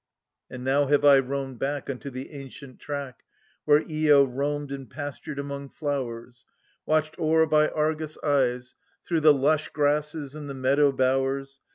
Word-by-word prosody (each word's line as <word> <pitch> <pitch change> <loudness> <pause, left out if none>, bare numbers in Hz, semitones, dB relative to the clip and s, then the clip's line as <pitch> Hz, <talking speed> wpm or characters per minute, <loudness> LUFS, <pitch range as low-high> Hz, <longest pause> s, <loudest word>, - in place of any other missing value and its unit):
And 125 -1 -8
now 140 +2 +2
have 145 +1 +3
I 140 -1 +8
roamed 135 -1 -4
back 140 +1 -2
Unto 140 +1 -5
the 130 0 -8
ancient 135 -2 -11
track 140 -4 -6 0.5
Whe 150 +1 +5
re 155 -1 0
lo 140 -1 +7
r 130 - -8
oamed 145 +1 -2
and 135 -2 -8
pastured 145 0 -7
among 140 0 -5
flowers, 125 -5 -5 0.4
'itched 155 +1 0
o'er 160 0 +3
by 155 -1 +3
Argus' 155 0 -2
eyes, 130 -3 0 0.3
Through 165 -2 0
the 155 0 +7
lush 145 +2 +1
grasses 150 0 -1
and 150 -2 -8
the 140 - -5
meadow 140 +2 +3
bowers. 135 +1 0
140 Hz, 165 wpm, -26 LUFS, 135-150 Hz, 0.5 s, I